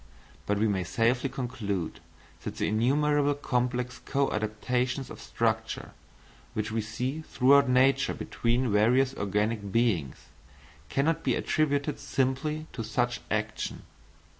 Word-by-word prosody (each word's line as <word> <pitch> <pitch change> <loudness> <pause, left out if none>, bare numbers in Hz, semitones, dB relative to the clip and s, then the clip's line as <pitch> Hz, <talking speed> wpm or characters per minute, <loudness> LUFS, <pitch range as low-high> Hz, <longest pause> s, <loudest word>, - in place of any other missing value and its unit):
But 105 - +1
we 110 +2 +2
may 95 -3 0
safely 120 +8 +1
conclude 105 -10 -3 0.4
that - - -5
the - - 0
innumerable 145 +6 +2
complex 125 -2 -1
co 140 -1 0
adaptations 125 +5 -1
of - - -9
structure, 110 -1 -1 0.6
which 110 0 -2
we 110 0 0
see 125 +7 -3
throughout 140 -2 +4
nature 130 +2 +3
between 120 +1 0
various 125 +6 +4
organic 105 -1 -1
beings, 95 - 0 0.6
cannot 150 +4 +1
be 130 -3 +2
attributed 145 -1 0
simply 140 +4 -1
to 115 - -4
such 120 +2 -1
action. 110 0 -2
125 Hz, 120 wpm, -28 LUFS, 110-135 Hz, 0.6 s, throughout